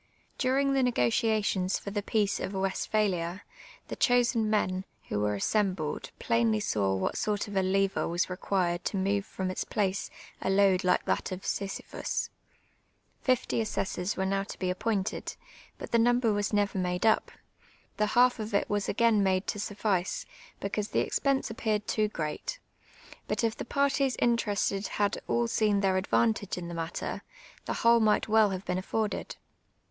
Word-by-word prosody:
During 275 +1 +2
the 270 - +3
negotiations 205 - +1
for 200 - -7
the 205 0 -1
peace 205 -1 0
of 195 - -4
Westphalia, 190 -2 -1 0.4
the - - -5
chosen 240 -3 +3
men, 185 -3 +1 0.3
who 105 - -1
were 105 0 +1
assembled, 185 - -1
plainly 230 -2 +2
saw 100 - 0
what 95 - -1
sort 210 -1 -1
of 205 - -7
a 190 - +3
lever 195 +1 +1
was 175 +1 0
required 180 -1 -1
to 200 - -1
move 200 +1 0
from 185 -1 -3
its - - -2
place 195 -2 -1 0.3
a - - -1
load 195 -1 +4
like 180 - +2
that - - -1
of 185 +1 -6
Sisyphus. 195 -1 -3 0.9
Fifty 255 -2 +1
assessors 195 -3 -2
were 190 - 0
now 195 +1 +1
to 195 - -7
be 185 -1 -1
appointed, 195 +1 -2 0.4
but - - -8
the 235 - +4
number 240 -1 +3
was 205 0 -1
never 205 -2 +1
made 180 +2 -1
up: 220 - +3 0.7
the 210 - +2
half 245 -1 +5
of 215 -1 -3
it - - +2
was 205 -1 -1
again 225 -1 +3
made 190 -1 +2
to 210 - -3
suffice, 205 -3 -1 0.3
because 205 +1 -2
the - - +1
expense 275 -4 0
appeared 215 -2 -1
too 215 0 +1
great; 165 - -4 0.7
but - - -1
if 225 -1 +1
the - - -6
parties 280 -2 +1
interested 210 -4 +1
had 205 -1 +1
all 235 0 +1
seen 210 -3 +2
their 190 -1 +2
advantage 200 +1 +1
in 175 -1 -5
the - - -6
matter, 165 0 -4 0.4
the - - -2
whole 235 0 +7
might 215 -1 +3
well 220 -1 +5
have 190 0 -4
been 180 0 -1
aiforded. 215 +3 -2
205 Hz, 165 wpm, -29 LUFS, 185-220 Hz, 0.9 s, whole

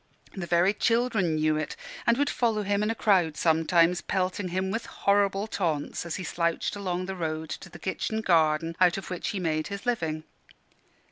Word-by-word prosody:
The 180 -3 -5
very 175 +3 +3
children 230 -7 +1
knew 155 0 +2
it, 155 - -3 0.3
and 235 0 +4
would 285 +1 +2
follow 225 -3 +1
him 200 0 0
in 210 - +1
a 225 - 0
crowd 180 -8 +2
sometimes, 165 +2 +3
pelting 185 0 -1
him 185 +2 -1
with 225 +2 -3
horrible 200 0 +1
taunts 170 -6 -2
as 165 - -3
he 185 - -4
slouched 170 +2 -1
along 185 -2 -2
the 190 +1 -4
road 160 -2 -3
to 185 - -7
the - - -11
kitchen 220 +3 -2
garden 165 -3 +2
out 180 0 +5
of 195 - -7
which 180 - -3
he 200 - -2
made 155 -3 -1
his 200 +3 -6
living. 160 -10 -1
185 Hz, 190 wpm, -27 LUFS, 165-205 Hz, 0.3 s, out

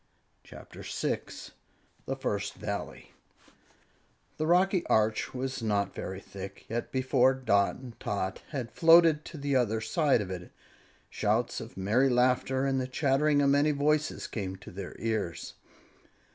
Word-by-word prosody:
CHAPTER - - -12
6 - - -4 0.6
THE 135 - -1
FIRST 100 -6 -3
VALLEY 100 -1 -6 1.3
The 155 - -1
rocky 180 +1 +3
arch 110 0 +2
was 130 0 -3
not 105 -2 0
very 95 0 -5
thick, 100 0 -9
yet 120 +1 -4
before 130 0 +3
Dot 100 -6 +2
and 125 -3 -11
Tot 95 -2 -3
had 130 -6 -4
floated 165 -2 +6
to 165 - -9
the 140 -1 -1
other 115 -3 +2
side 145 - +2
of 95 -2 -5
it, 90 -1 -7 0.6
shouts - - 0
of - - -10
merry 110 +8 +2
laughter 125 +2 +2
and 135 -1 +1
the 130 - -3
chattering 145 +2 +2
of 140 - +4
many 145 +2 +4
voices 150 +1 0
came 95 -4 -4
to 95 - -12
their 95 0 -7
ears. 110 -7 -3
130 Hz, 145 wpm, -29 LUFS, 100-140 Hz, 1.3 s, floated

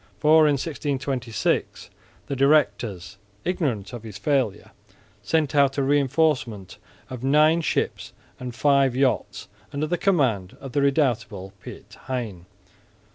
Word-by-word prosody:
For 155 +5 +5
in 145 - +3
1626 135 - -2 0.3
the 140 - -4
directors, 125 - +1 0.3
ignorant 130 - -2
of 120 - -6
his 105 -3 -9
failure, 130 -2 -1 0.5
sent 160 -3 0
out 140 -2 +3
a 140 - +1
reinforcement 135 - 0 0.3
of 125 -1 -7
nine 155 +4 +4
ships - - -2 0.3
and 125 -1 -6
five 140 -3 +3
yachts 125 -6 0 0.2
under 145 +1 -2
the 175 +3 -2
command 125 - +1
of 135 - -8
the 140 - +1
redoubtable 115 -9 0
Piet - - -11
Hein. 110 -9 -4
135 Hz, 125 wpm, -24 LUFS, 115-150 Hz, 0.5 s, For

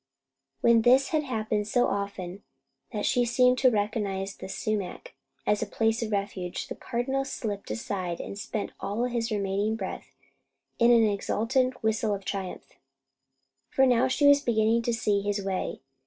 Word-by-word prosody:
When 235 -1 +5
this 255 +4 +5
had 310 -1 +1
happened 215 -4 -1
so 245 +3 +3
often 200 -2 -3 0.5
that 210 -3 -2
she 245 - +3
seemed 250 +1 +3
to 260 - +6
recognize 205 -3 -1
the - - -9
sumac 215 - -3 0.3
as 210 - +2
a - - -1
place 225 0 0
of 225 -2 -3
refuge, 200 -3 -3
the - - -4
Cardinal 265 +3 -2
slipped 210 -7 -5
aside 175 - -3
and - - -6
spent 210 0 -4
all 210 +4 -2
his 235 -2 -1
remaining 205 +1 0
breath 195 -4 -6 0.6
in 235 - +5
an 235 -1 +6
exultant 230 +6 0
whistle 220 -1 +1
of 195 -1 -9
triumph, 195 -2 -6 0.9
for 265 - +4
now 250 0 +4
he 285 +3 +2
was 285 0 +7
beginning 225 -2 +2
to 235 - -1
see 210 -3 +1
his 205 -1 -2
way. 190 -1 -3
220 Hz, 160 wpm, -27 LUFS, 200-240 Hz, 0.9 s, was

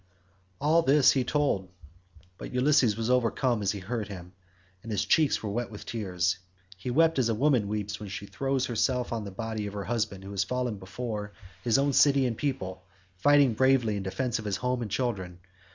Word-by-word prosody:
All 155 +4 +4
this 145 -3 +5
he 130 - +1
told, 125 -9 0 0.7
but - - -7
Ulysses 125 -4 +3
was 115 +2 -1
overcome 125 -1 +1
as 100 - +1
he 105 - -5
heard 105 +2 -4
him, 90 -2 -9 0.5
and 115 - -8
his 105 - 0
cheeks 155 -7 +3
were 105 - -2
wet 120 +3 -2
with 105 - -10
tears. 90 -5 -1 0.4
He 95 +7 -6
wept 165 +3 +3
as 120 -3 +2
a 115 - +1
woman 125 -4 +2
weeps 105 0 -3
when 105 -2 -7
she 100 +1 -6
throws 135 +3 -1
herself 125 +1 0
on 110 -2 -3
the - - -5
body 110 +1 -4
of 100 - -7
her 100 - -3
husband 110 -5 -2
who 100 - -8
has 100 -1 0
fallen 125 0 -2
before 105 +2 -5 0.3
his 120 0 +3
own 140 0 +2
city 140 0 +5
and 120 -2 -1
people, 95 -10 -3 0.4
fighting 140 +4 +5
bravely 130 -3 +3
in 100 - -3
defence 105 +5 -2
of 110 - -8
his 100 -1 -1
home 125 0 -1
and 115 - -4
children. 95 -7 -2
115 Hz, 200 wpm, -28 LUFS, 100-130 Hz, 0.7 s, this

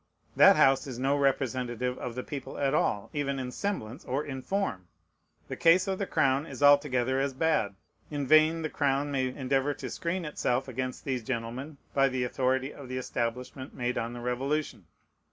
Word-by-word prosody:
That - - +8
House 135 +2 +4
is 130 -3 -6
no 135 +3 +1
representative 125 -3 0
of 120 -2 -5
the 125 - -4
people 140 -3 -7
at 140 -1 +1
all, 105 -8 0
even 140 -2 -1
in 125 -1 -4
"semblance" 130 - -4
or 140 +4 -2
"in 130 -3 -5
form." 130 - -2 0.6
The - - -4
case 180 +3 +4
of 190 -1 -1
the 200 - -2
crown 140 -1 +2
is 145 - -5
altogether 135 -3 +4
as 140 -1 -1
bad. 140 -10 +1 0.3
In 145 -2 -3
vain 155 +3 +5
the 155 - -1
crown 140 0 0
may 130 -2 +1
endeavor 135 +2 0
to - - -6
screen 175 0 -2
itself 135 -3 -1
against 130 0 -4
these 130 -3 -2
gentlemen 125 +5 -4 0.2
by 135 -1 +4
the 130 -1 -1
authority 130 +2 0
of 135 -3 -11
the 130 - -3
establishment 125 +1 -4
made 125 0 -1
on 115 +1 -3
the 120 - -7
Revolution. 125 - -2
135 Hz, 185 wpm, -29 LUFS, 125-145 Hz, 0.6 s, That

